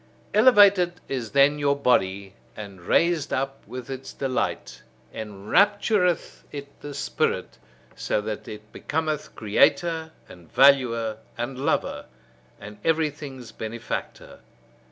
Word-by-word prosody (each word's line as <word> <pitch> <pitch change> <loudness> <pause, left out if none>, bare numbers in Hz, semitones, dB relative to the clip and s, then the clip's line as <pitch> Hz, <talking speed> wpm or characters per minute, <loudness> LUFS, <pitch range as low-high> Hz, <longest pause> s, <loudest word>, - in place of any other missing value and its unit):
Elevated 205 -6 +6
is 125 -5 -3
then 140 +3 +4
your 140 -1 +2
body, 100 -8 +1 0.2
and 100 -4 -9
raised 165 - +1
up; 135 +1 -2
with 125 -1 -7
its 130 0 -7
delight, 135 -2 -3 0.3
enraptureth 180 - +1
it 140 -1 -7
the 145 -1 -7
spirit; - - -2 0.4
so - - -1
that 105 0 -5
it 105 0 -10
becometh 155 -1 -3
creator, 160 +9 +2 0.2
and 85 -2 -15
valuer, 120 -5 +4 0.2
and 125 +2 -4
lover, 140 - -1 0.5
and 105 0 -11
everything's 145 -6 -2
benefactor. 115 +1 -6
135 Hz, 110 wpm, -25 LUFS, 110-160 Hz, 0.5 s, Elevated